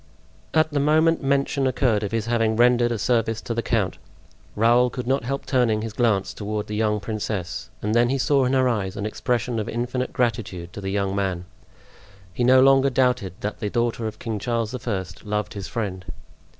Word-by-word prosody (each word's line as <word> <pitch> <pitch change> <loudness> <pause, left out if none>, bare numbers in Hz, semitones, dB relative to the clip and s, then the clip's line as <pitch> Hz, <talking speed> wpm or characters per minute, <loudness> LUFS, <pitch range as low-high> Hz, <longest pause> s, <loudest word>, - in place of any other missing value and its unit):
At 155 0 +3
the 145 - 0
moment 155 +3 +3
mention 140 0 +1
occurred 125 -4 +1
of 105 - -3
his 115 -1 -1
having 115 -2 +1
rendered 120 0 +4
a 115 - -1
service 115 -1 +1
to 115 - -4
the 115 - -1
count, - - -1 0.6
Raoul 120 +3 +4
could 125 -1 -5
not 130 -1 0
help 135 +2 -3
turning 115 -5 +1
his 115 -2 -5
glance 110 -5 +1
toward 105 0 -4
the 105 - -5
young 105 -1 +1
princess, 100 -6 -4
and 105 +1 0
then 120 +1 +4
he 135 - +1
saw 135 0 +2
in 125 - 0
her 130 -1 +3
eyes 105 -4 -1
an 100 - -3
expression 115 +2 -1
of 105 - -3
infinite 125 +2 -2
gratitude 100 -7 -2
to 100 - -7
the 95 - -3
young 100 0 -1
man; 95 -3 -2 0.9
he 125 - -1
no 130 +1 +6
longer 135 0 +5
doubted 125 -7 +1
that 105 - -4
the 105 - -2
daughter 115 0 -1
of 110 - -6
King 110 -3 -4
Charles 115 0 -2
I. 95 -5 -1 0.2
loved 105 0 -2
his 100 -2 -6
friend. 95 -5 -4
115 Hz, 200 wpm, -23 LUFS, 105-125 Hz, 0.9 s, no